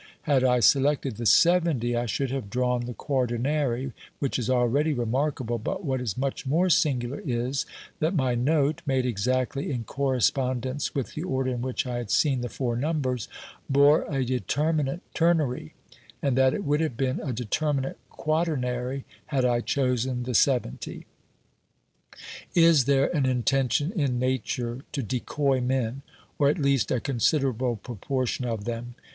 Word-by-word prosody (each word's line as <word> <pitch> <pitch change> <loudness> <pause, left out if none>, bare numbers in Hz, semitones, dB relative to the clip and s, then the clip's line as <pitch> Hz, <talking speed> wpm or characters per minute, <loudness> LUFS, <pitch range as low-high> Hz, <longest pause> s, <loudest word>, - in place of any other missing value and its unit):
Had 140 -4 +2
I 125 -1 +3
selected 135 -2 +3
the 115 -1 -1
70 160 - +4
I 120 0 -1
should 130 +4 -1
have 130 -7 -4
drawn 125 +1 0
the 125 - -5
quaternary, 130 0 -1 0.2
which 140 -2 -1
is 120 - -2
already 130 +5 +2
remarkable, 120 0 -1
but 190 - -4
what 130 -3 -1
is 115 -5 -3
much 135 +1 -2
more 175 +6 +2
singular 135 -4 +1
is, 125 0 -1 0.3
that 160 +5 0
my 130 -5 +1
note, 145 +4 +1
made 130 -2 +1
exactly 130 +4 -1
in 125 -5 -2
correspondence 130 +1 0
with 135 -3 -3
the 155 - -4
order 130 -6 -1
in 120 -1 -3
which 130 +2 -2
I 125 -1 -3
had 120 -4 -5
seen 135 -1 +2
the 120 - -3
four 120 -2 -2
numbers, 130 -3 -1 0.4
bore 140 +2 +5
a 135 -3 0
determinate 140 - 0
ternary, 160 - +1 0.4
and 140 -3 0
that 130 0 +4
it 205 - -3
would 145 +2 +1
have 155 -8 -2
been 130 -1 0
a 140 - -3
determinate 135 +4 -1
quaternary 135 -5 -1 0.2
had 135 -4 +1
I 120 -1 +2
chosen 125 -1 0
the 125 +1 -3
70. 120 - 0 1.5
Is 165 -6 +6
there 140 +4 +2
an 140 -3 +2
intention 130 +3 +1
in 140 - 0
Nature 130 -1 -2
to 140 - -2
decoy 130 +3 0
men, 125 0 -1 0.4
or 140 -1 +5
at 150 - +1
least 140 - +2
a 125 - +1
considerable 130 -1 +1
proportion 125 +4 -3
of 115 -4 -3
them 120 0 -5
130 Hz, 155 wpm, -26 LUFS, 120-140 Hz, 1.5 s, Is